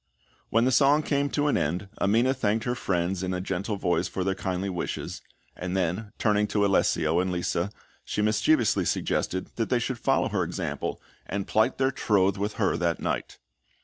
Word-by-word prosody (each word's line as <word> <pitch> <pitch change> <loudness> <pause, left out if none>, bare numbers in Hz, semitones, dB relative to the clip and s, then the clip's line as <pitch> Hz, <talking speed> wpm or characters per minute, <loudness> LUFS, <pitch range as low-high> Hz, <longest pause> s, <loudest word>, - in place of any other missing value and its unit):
When 115 +2 +3
the 130 - +3
song 145 +3 +4
came 140 -1 0
to 145 0 0
an 145 - +2
end 90 +7 -1
Amina 115 +6 +3
thanked 110 -3 0
her 125 - 0
friends 90 -4 -1
in 95 -1 -2
a - - -2
gentle 95 +3 -2
voice 90 -2 +1
for 95 - -3
their 95 +1 +1
kindly 95 0 -3
wishes; 90 -3 -4 0.3
and 90 +1 -3
then, 95 +4 -1
turning 105 -1 +2
to 100 -1 +1
Alessio 85 -4 +2
and 95 0 0
Lisa, 90 +1 -1 0.3
she 105 - -2
mischievously 110 +4 +3
suggested 95 0 -1
that 115 - -1
they 125 - +3
should 120 0 -2
follow - - +2
her - - 0
example - - -3 0.3
and 100 -1 -3
plight 110 +4 +2
their 135 0 +2
troth 100 -6 +2
with 105 +1 -1
her 100 - +1
that 85 -1 0
night. - - -3
100 Hz, 185 wpm, -27 LUFS, 90-115 Hz, 0.3 s, song